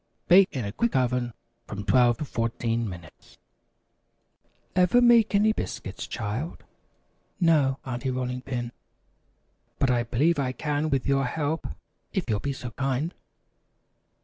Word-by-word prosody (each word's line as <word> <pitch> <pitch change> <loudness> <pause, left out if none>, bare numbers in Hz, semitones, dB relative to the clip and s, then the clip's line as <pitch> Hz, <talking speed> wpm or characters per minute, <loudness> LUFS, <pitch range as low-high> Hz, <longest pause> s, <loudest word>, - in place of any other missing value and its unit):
Bake 185 +2 +7
in 125 -5 -3
a 100 - -3
quick 235 - -1
oven 125 -1 +1 0.4
from 100 0 -6
12 120 0 +4
to 150 - -4
14 115 -2 -1
minutes. 85 -3 -12 1.4
"Ever 180 +6 +5
make 235 -3 +5
any 215 +2 +4
biscuits, 105 - -5
child?" 115 +9 -4 0.8
"No, 150 -6 +3
Aunty 130 0 -3
Rolling 125 0 -2
Pin, 120 -2 -4 1.1
but 130 - +2
I 120 -1 +2
believe 140 +8 +1
I 130 -2 0
can 150 +2 -1
with 135 -3 0
your 135 0 +2
help, 155 +4 -2 0.5
if 190 - -1
you'll 105 -4 0
be 140 - -2
so 125 -3 -6
kind." 135 +6 -1
130 Hz, 135 wpm, -26 LUFS, 120-155 Hz, 1.4 s, Bake